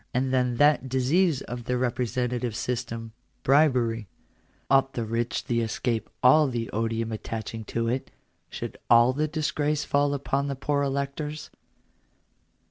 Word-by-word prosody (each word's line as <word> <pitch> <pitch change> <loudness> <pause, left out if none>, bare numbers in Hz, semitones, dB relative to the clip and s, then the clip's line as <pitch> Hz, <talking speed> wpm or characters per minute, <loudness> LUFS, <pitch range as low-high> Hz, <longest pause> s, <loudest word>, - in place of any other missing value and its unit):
And 130 +1 +1
then 125 -1 +2
that 145 0 +3
disease 135 +4 +2
of 120 -1 -7
the 125 0 0
representative 125 -1 -1
system 115 -1 -3 0.2
— - - -43
bribery; 125 -6 +3 0.6
ought 135 0 +3
the 115 - -2
rich 115 +2 -2
to 120 -1 0
escape 115 0 -2
all 150 +4 +6
the 120 -3 -3
odium 115 +1 -1
attaching 110 0 -5
to 115 +1 -2
it 125 +3 -2 0.2
— - - -45
should - - -6
all 120 +2 +6
the 150 +3 0
disgrace 150 -1 -1
fall 145 0 +2
upon 140 0 -1
the 140 - -2
poor 140 +2 0
electors 140 +2 -3
125 Hz, 145 wpm, -26 LUFS, 115-140 Hz, 0.6 s, all